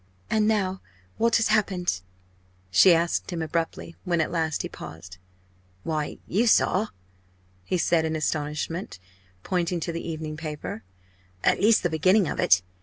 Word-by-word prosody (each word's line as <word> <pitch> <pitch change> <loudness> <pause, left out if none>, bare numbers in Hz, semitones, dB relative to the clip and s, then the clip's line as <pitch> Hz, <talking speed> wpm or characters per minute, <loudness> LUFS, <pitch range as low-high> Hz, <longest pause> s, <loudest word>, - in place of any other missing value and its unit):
"And 215 -1 +3
now 190 -4 0 0.4
what 230 +1 +3
has 225 - +3
happened?" 180 - +1 0.7
she 100 - +7
asked 170 0 +1
him 170 -3 -3
abruptly, 165 +1 -3
when 175 -3 0
at 160 - 0
last 160 -2 -1
he - - -3
paused. 80 +3 -10 0.6
"Why, 155 -2 -2
you 225 +7 +1
saw!" 210 -1 +3 0.8
he 180 - 0
said 170 -1 +2
in 160 0 -1
astonishment, 150 - -2 0.5
pointing 175 -1 -1
to 170 - -2
the 165 0 -4
evening 155 -1 -5
paper 150 -7 -5 0.6
"at - - +3
least 215 +2 +5
the 175 - +2
beginning 185 +5 +3
of - - -4
it. 95 0 +4
170 Hz, 150 wpm, -26 LUFS, 155-185 Hz, 0.8 s, she